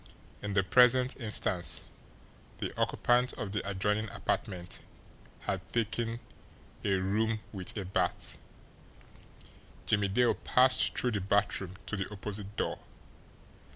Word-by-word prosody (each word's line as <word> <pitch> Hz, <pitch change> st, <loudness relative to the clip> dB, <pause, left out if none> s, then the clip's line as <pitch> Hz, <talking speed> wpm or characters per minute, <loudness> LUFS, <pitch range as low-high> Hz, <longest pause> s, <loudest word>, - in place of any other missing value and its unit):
In 100 Hz, -1 st, -3 dB
the 95 Hz, -, +4 dB
present 125 Hz, +5 st, +5 dB
instance, 105 Hz, -6 st, 0 dB, 0.7 s
the -, -, -4 dB
occupant 125 Hz, +1 st, +2 dB
of 100 Hz, -, -5 dB
the 105 Hz, -, -1 dB
adjoining 105 Hz, +3 st, 0 dB
apartment 90 Hz, -2 st, -3 dB, 0.6 s
had -, -, -4 dB
taken 115 Hz, 0 st, -1 dB, 0.6 s
"a 100 Hz, -, +2 dB
room 105 Hz, +4 st, 0 dB
with 95 Hz, +1 st, -5 dB
a 100 Hz, -, -3 dB
bath." 90 Hz, -1 st, -1 dB, 1.5 s
Jimmie 105 Hz, -1 st, +2 dB
Dale 120 Hz, +5 st, +3 dB
passed 130 Hz, +1 st, +3 dB
through 125 Hz, -, +2 dB
the 105 Hz, -3 st, -1 dB
bathroom 100 Hz, -1 st, +1 dB
to -, -, -3 dB
the 100 Hz, 0 st, -3 dB
opposite 105 Hz, 0 st, -6 dB
door. -, -, -1 dB
105 Hz, 120 wpm, -31 LUFS, 95-115 Hz, 1.5 s, present